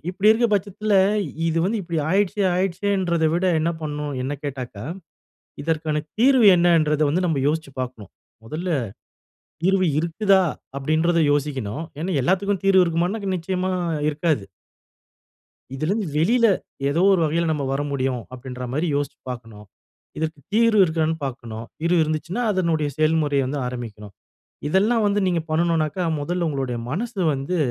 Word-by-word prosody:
இப்படி 195 +3 +2
இருக்க 235 +2 +4
பட்சத்துல, 205 +1 -1 0.5
இது 165 0 0
வந்து 215 +3 0
இப்படி 170 -2 -3
ஆயிடுச்சே 200 +1 +1
ஆயிடுச்சேன்றத 185 -2 0
விட 175 - 0
என்ன 165 +2 +1
பண்ணணும் 150 -1 -4
என்ன 135 +3 -2
கேட்டாக்கா, 125 -6 -5 0.8
இதற்கான 155 -1 -1 0.2
தீர்வு 255 -2 +5
என்னன்றத 165 -3 +3
வந்து 180 +5 +1
நம்ம 160 -5 0
யோசிச்சு 155 -1 -2
பாக்கணும். 120 -6 -6 0.3
மொதல்ல 160 +9 -4 0.9
தீர்வு 190 0 +3
இருக்குதா? 190 +4 +3 0.3
அப்படின்றத 160 +5 +1
யோசிக்கணும். 140 -3 -2 0.2
ஏன்னா 180 +3 -2
எல்லாதுக்கும் 195 +5 +1
தீர்வு 190 -1 +6
இருக்குமானாக்கா, 180 +5 -1
நிச்சயமா 185 +2 -2 0.4
இருக்காது. 150 - 0 1.3
இதுலருந்து 190 +9 -1
வெளில 230 +10 +4 0.4
ஏதோ 160 +6 +1
ஒரு 185 - +3
வகையில 165 +2 0
நம்ம 145 -2 -2
வர 135 - -1
முடியும் 130 -3 -1
அப்படின்ற 125 0 -7
மாரி 155 +6 0
யோசிச்சு 145 0 -3
பாக்கணும். 115 -4 -9 0.5
இதற்கு 155 -2 -3
தீர்வு 225 -2 +4
இருக்கான்னு 160 -1 0
பாக்கணும். 120 -4 -6
தீர்வு 170 +2 +2
இருந்துச்சுன்னா 155 +8 -3
அதனுடைய 165 -5 0
செயல்முறையை 155 -3 +2
வந்து 145 +2 -3
ஆரம்பிக்கணும். 110 -5 -7 0.5
இதெல்லாம் 215 +6 +2
வந்து 205 0 +1
நீங்க 175 -2 +1
பண்ணணுனாக்கா, 165 +1 +1 0.2
மொதல்ல 170 +3 -1
உங்களுடைய 135 -4 -2
மனசு 215 - -3
வந்து 135 +7 -2
160 Hz, 130 wpm, -23 LUFS, 145-185 Hz, 1.3 s, தீர்வு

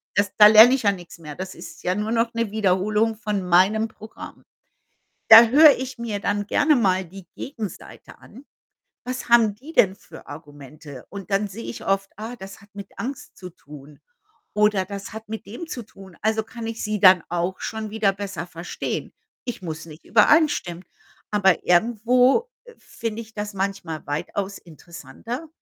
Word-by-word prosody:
das 205 0 +1
da 210 - +10
lerne 220 +4 +8
ich 265 - -1
ja 200 - +4
nix 175 -2 -12
mehr. 150 -3 -9
Das 185 +3 -7
ist - - -12
ja 180 - 0
nur 210 +2 -3
noch 230 0 +1
'ne 230 -1 -2
Wiederholung 210 +2 +1
von 210 -2 -3
meinem 190 +5 +3
Programm. 220 0 -12 0.9
Da 225 +1 +11
höre 295 +5 +7
ich 260 0 -6
mir 230 -3 -4
dann 205 0 -2
gerne 295 +6 +3
mal 190 -6 +1
die 190 +2 -13
Gegenseite 225 - -9
an. 250 +6 -15 0.6
Was 255 0 -5
haben 230 -3 +5
die 280 +9 -13
denn 195 - +3
für - - -15
Argumente? 145 -2 -12
Und 200 0 -9
dann 200 +1 +1
sehe 220 +4 -9
ich - - -8
oft: 195 0 0
„Ah, 225 +3 -7
das 195 -1 -11
hat 205 - -20
mit 200 -1 -9
Angst 270 +2 -7
zu 180 - -9
tun“ 150 -3 -15 0.5
oder 210 -2 +2
„Das 200 +1 -8
hat 220 0 -9
mit 220 0 -6
dem 245 +11 -8
zu 250 -7 -6
tun“, 195 -4 -16
also 220 +1 +1
kann 230 +1 -8
ich 225 0 -5
sie 210 0 -2
dann 185 -2 +7
auch 175 +2 -2
schon 220 -1 -5
wieder 215 -2 +1
besser 195 -3 -6
verstehen. 170 0 -5 0.4
Ich 240 - -6
muss 160 -2 -6
nicht 155 0 -13
übereinstimmen. 210 - +2 0.5
Aber 190 -4 +2
irgendwo 240 - +3 0.3
finde 230 -1 -6
ich 220 -1 -14
das 210 -1 -5
manchmal 195 -5 -4
weitaus 190 +7 -4
interessanter, 170 - -9
205 Hz, 175 wpm, -23 LUFS, 185-225 Hz, 0.9 s, Da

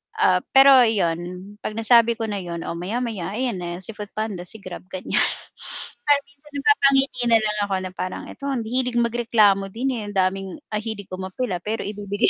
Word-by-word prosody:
Ah, - - +4 0.2
pero 275 +1 +9 0.2
yun, 175 -7 +1 0.4
pag 215 - -5
nasabi 230 +1 +5
ko 225 - -4
na 205 -1 -2
yun, 170 -2 -5
oo - - -4
maya 200 +8 -2
maya 200 -5 -4
ayan 245 -6 -1
na 175 -1 -4
si 225 - -4
FoodPanda, 210 -3 -5
si 220 - -3
Grab 180 0 -8
ganyan. 185 - 0 0.9
Kaya 290 -1 +6
minsan 290 +1 -21
napapangiti 275 - +3
na 230 -1 +6
lang 210 -1 -1
ako 195 - 0
na 185 - -5
parang, 185 0 -5
ito - - -14
ang 260 -5 -1
hilig 250 +2 -1
magreklamo 225 -4 +3
din 240 +7 -2
eh - - -4
ang 205 - -8
daming 190 0 +1 0.2
ang 210 0 -2
hilig 220 -3 -5
ko 185 - -5
umapela 190 +1 -3
pero 215 +5 -3
ibibigay. 205 +1 0
215 Hz, 195 wpm, -23 LUFS, 190-240 Hz, 0.9 s, pero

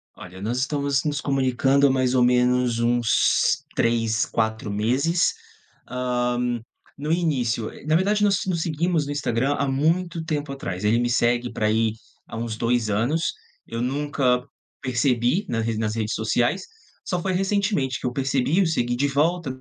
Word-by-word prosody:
Olha, 90 +1 -11
nós 115 +4 -2
estamos 140 0 0
nos 145 -1 -1
comunicando 135 0 +2
há - - +2
mais 130 -1 +1
ou 125 -1 +4
menos 125 -1 +2
uns 120 -1 +2
3, 115 -2 +1
4 110 -1 -2
meses. 130 - +1 0.5
Hã, 125 -1 -1 0.4
no 150 +2 -3
início, 130 -10 0
eh - - -13
na 155 +1 +2
verdade 205 +4 +2
nós 200 -3 +2
nos 175 -3 -1
seguimos 165 0 0
no 145 - -4
Instagram 135 -1 0
há 140 - 0
muito 165 +5 0
tempo 150 -3 -2
atrás, 105 -8 -5
ele 110 +3 +3
me 120 0 0
segue 120 0 +1
pra 110 -1 -1
aí, 110 0 +2 0.3
há - - -7
uns 115 -1 -4
2 115 -1 0
anos, 125 - 0 0.3
eu 115 - -5
nunca 130 -1 0 0.4
percebi 130 - +1
na 115 -7 -1
re 115 -1 -2
nas 110 0 -1
redes 110 -1 -2
sociais, 120 - 0 0.4
só 180 -1 -2
foi 190 - -1
recentemente 195 - 0
que - - -6
eu 125 - 0
percebi, 135 +6 +1
o 185 - +2
segui 120 -7 0
de 140 +3 +2
volta 155 +2 0
130 Hz, 170 wpm, -24 LUFS, 120-150 Hz, 0.5 s, ou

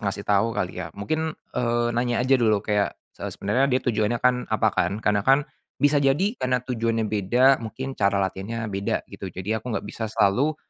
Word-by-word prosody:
ngasih 100 -1 -3
tau 105 +2 +2
kali - - -2
ya, - - -5
mungkin, 155 +9 -2 0.2
eee, 120 0 0
nanya 120 +1 0
aja 135 +1 +4
dulu 110 -3 +2
kayak, 105 -1 0 0.2
se - - -6
sebenarnya 125 +7 +1
dia 130 -1 +2
tujuannya 115 -1 +1
kan 125 +1 +3
apa - - +2
kan? - - +1
Karena 105 -1 +3
kan 135 +6 +3 0.3
bisa 145 0 +3
jadi 145 +10 +2
karena 125 0 +1
tujuannya 115 -2 -1
beda 120 +6 +3
mungkin 125 +5 -5
cara 100 -4 +1
latihannya 105 +5 -4
beda 100 +1 -1
gitu, 95 - -6
jadi 100 +5 -3
aku 120 -3 -3
gak - - -4
bisa 110 -1 -5
selalu, 125 +9 +2
115 Hz, 190 wpm, -24 LUFS, 105-130 Hz, 0.3 s, aja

